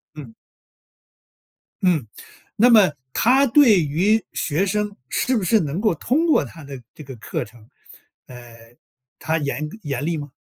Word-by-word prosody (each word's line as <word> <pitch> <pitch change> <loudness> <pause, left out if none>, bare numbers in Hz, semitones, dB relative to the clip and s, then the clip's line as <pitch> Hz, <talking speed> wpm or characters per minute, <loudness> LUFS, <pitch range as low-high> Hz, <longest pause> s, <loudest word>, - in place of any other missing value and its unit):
嗯。 135 -7 -11 1.5
嗯， 170 -10 +1 0.5
那 235 +3 +5
么 210 -8 +5 0.2
她 265 - +3
对 240 -6 +5
于 185 +9 +1
学 165 +6 -1
生 210 +1 -2
是 255 - -1
不 210 - -1
是 220 +4 +3
能 155 +2 -3
够 215 -4 +1
通 280 - 0
过 310 - +3
她 145 +4 -12
的 135 -2 -9
这 155 - -12
个 135 -1 -10
课 110 - -5
程， 110 0 -19 0.6
呃， 120 -2 -14 0.4
她 160 +1 -1
严 150 +1 -3
严 140 -4 -4
厉 165 +1 -1
吗？ 145 -2 -7
160 Hz, 160 characters per minute, -21 LUFS, 140-215 Hz, 1.5 s, 那